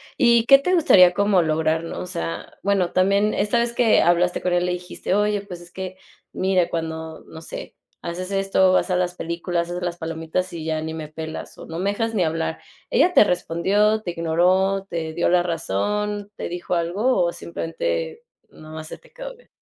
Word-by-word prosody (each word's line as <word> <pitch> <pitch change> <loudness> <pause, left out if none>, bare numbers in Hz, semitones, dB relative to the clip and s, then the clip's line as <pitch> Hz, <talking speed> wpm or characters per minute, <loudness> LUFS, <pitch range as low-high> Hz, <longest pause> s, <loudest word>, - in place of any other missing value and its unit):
y 235 -2 +4
¿qué 275 +3 +8
te 360 +7 +1
gustaría 185 - +6
como 200 -2 +3
lograr?, 160 0 0
¿no? 165 - -5
O - - -5
sea, 170 -2 -5
bueno, 195 -3 +1
también 200 +3 +2
esta 210 +3 +1
vez 235 0 0
que 235 -2 +4
hablaste 175 +1 +2
con 180 - +1
ella 175 0 +2
le 180 - 0
dijiste: 180 +1 -3
"Oye, 210 0 +1
pues, 180 -4 -9
es 175 0 -15
que 185 0 -6 0.4
mira, 185 -2 +1
cuando, 160 -1 -5
no 160 - -11
sé, - - -8 0.3
haces 180 +2 -5
esto, 195 -1 +2
vas 185 - +2
a - - +2
las 180 0 0
películas, 170 0 -2
haces 180 +1 -4
las 175 -1 -3
palomitas 165 +2 -3
y 165 -2 -6
ya 160 -1 -1
ni 160 0 -4
me 160 -1 -6
pelas 160 +1 -7
o - - -10
no 165 +1 -6
me 195 +2 0
dejas 225 +2 -2
ni 195 -5 +2
hablar". 165 0 -2 0.3
Ella, 360 - +4
¿te - - +9
respondió? 205 +4 +1
¿Te 175 - -3
ignoró? 180 +4 +1
¿Te 165 -3 -4
dio 170 - +1
la 180 0 +4
razón? 205 - -2
¿Te - - -5
dijo 175 +1 -3
algo 180 +5 +1
o 170 - 0
simplemente 475 - -4 0.3
no 155 - -14
más 155 0 -7
se - - -8
te - - -22
quedó - - -8
viendo? - - -23
180 Hz, 205 wpm, -22 LUFS, 165-205 Hz, 0.4 s, te